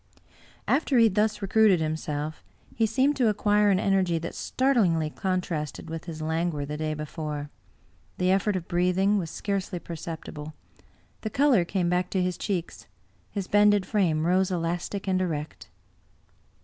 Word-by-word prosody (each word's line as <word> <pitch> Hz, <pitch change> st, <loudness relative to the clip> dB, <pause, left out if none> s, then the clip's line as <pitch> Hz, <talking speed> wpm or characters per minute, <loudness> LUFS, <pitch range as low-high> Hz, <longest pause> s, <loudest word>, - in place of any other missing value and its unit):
After 280 Hz, -2 st, +2 dB
he 230 Hz, -, +7 dB
had 220 Hz, -4 st, +4 dB
thus 210 Hz, 0 st, +1 dB
recruited 195 Hz, -2 st, +4 dB
himself, 155 Hz, -1 st, -3 dB, 0.3 s
he 225 Hz, -1 st, +1 dB
seemed 265 Hz, +6 st, +2 dB
to 250 Hz, -4 st, +3 dB
acquire 210 Hz, 0 st, +3 dB
an 190 Hz, -2 st, +3 dB
energy 190 Hz, -3 st, +2 dB
that 165 Hz, +1 st, -5 dB
startlingly 190 Hz, -, +1 dB
contrasted 175 Hz, -5 st, -3 dB
with 165 Hz, 0 st, -5 dB
his 160 Hz, -2 st, -6 dB
languor 160 Hz, -2 st, -1 dB
the 150 Hz, +1 st, -5 dB
day 155 Hz, 0 st, -2 dB
before; 150 Hz, -1 st, -5 dB, 0.7 s
the 180 Hz, 0 st, +2 dB
effort 195 Hz, +1 st, +2 dB
of 175 Hz, -2 st, -4 dB
breathing 180 Hz, +3 st, +2 dB
was 165 Hz, -4 st, -4 dB
scarcely 195 Hz, 0 st, -3 dB
perceptible; 160 Hz, -2 st, -7 dB, 0.7 s
the 215 Hz, -, -3 dB
color 260 Hz, -4 st, +3 dB
came 180 Hz, 0 st, -1 dB
back 180 Hz, +1 st, 0 dB
to 185 Hz, -2 st, 0 dB
his 180 Hz, -1 st, -1 dB
cheeks; 185 Hz, -5 st, -4 dB, 0.4 s
his 200 Hz, -3 st, -4 dB
bended 205 Hz, -1 st, +4 dB
frame 165 Hz, -7 st, +1 dB
rose 185 Hz, +2 st, +2 dB
elastic 175 Hz, +3 st, -3 dB
and 185 Hz, -1 st, +1 dB
erect. 155 Hz, -4 st, -4 dB
180 Hz, 150 wpm, -26 LUFS, 160-205 Hz, 0.7 s, he